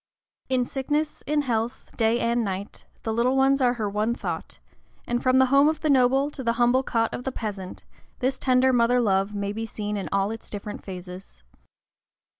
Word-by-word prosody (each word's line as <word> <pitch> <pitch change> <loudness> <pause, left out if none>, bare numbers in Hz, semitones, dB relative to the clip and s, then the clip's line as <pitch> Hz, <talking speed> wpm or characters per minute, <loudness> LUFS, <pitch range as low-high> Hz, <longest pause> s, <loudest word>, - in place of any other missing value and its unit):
In 255 -1 +2
sickness, 295 +4 -2
in 295 0 +1
health, 235 -2 -2
day 225 +1 +2
and 235 0 +1
night, 195 0 -5 0.2
the 220 - -1
little 245 +4 +2
ones 270 +1 +3
are 245 -1 +4
her 220 -3 -2
one 210 +3 0
thought; - - -5 0.5
and 240 0 -1
from 255 0 +3
the 260 - +6
home 280 +2 +6
of 315 - -3
the 310 - +2
noble 270 +2 +3
to 265 - -7
the 230 -1 +1
humble 245 +2 +3
cot 230 -3 0
of 245 - -5
the 265 - -2
peasant, 205 -6 -6 0.3
this 260 +1 -1
tender 260 0 +3
mother 245 +1 +3
love 200 -2 +1
may 200 0 -2
be 225 +1 -4
seen 210 -1 -4
in 195 - -4
all 195 +1 +1
its 225 - -8
different 205 0 -6
phases. 180 - -9
235 Hz, 195 wpm, -25 LUFS, 210-260 Hz, 0.5 s, the